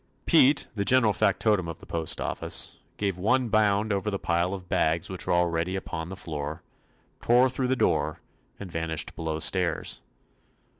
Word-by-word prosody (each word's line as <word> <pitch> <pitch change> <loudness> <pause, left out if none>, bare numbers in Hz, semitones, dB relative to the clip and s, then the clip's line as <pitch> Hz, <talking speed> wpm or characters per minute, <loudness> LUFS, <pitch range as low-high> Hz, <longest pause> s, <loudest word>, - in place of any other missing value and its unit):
Pete, 140 +3 +4
the 100 -3 -1
general 115 -1 +4
factotum 100 -2 +2
of 85 -1 -6
the - - -14
postoffice, 80 -1 -1 0.2
gave 100 -3 -2
one 125 +5 +2
bound 105 -1 +2
over 100 +1 -1
the 100 - -2
pile 85 0 0
of 95 -2 -6
bags 80 +1 0
which 95 - -2
were - - +2
already 85 +1 +1
upon 80 -3 -5
the 95 - -6
floor, 75 -4 -5 0.6
tore 125 +2 +4
through 130 0 -1
the 130 - +1
door, - - 0 0.4
and 95 -3 -8
vanished 80 -2 -2
below 80 -1 -3
stairs. 85 +1 0
95 Hz, 160 wpm, -27 LUFS, 85-105 Hz, 0.6 s, Pete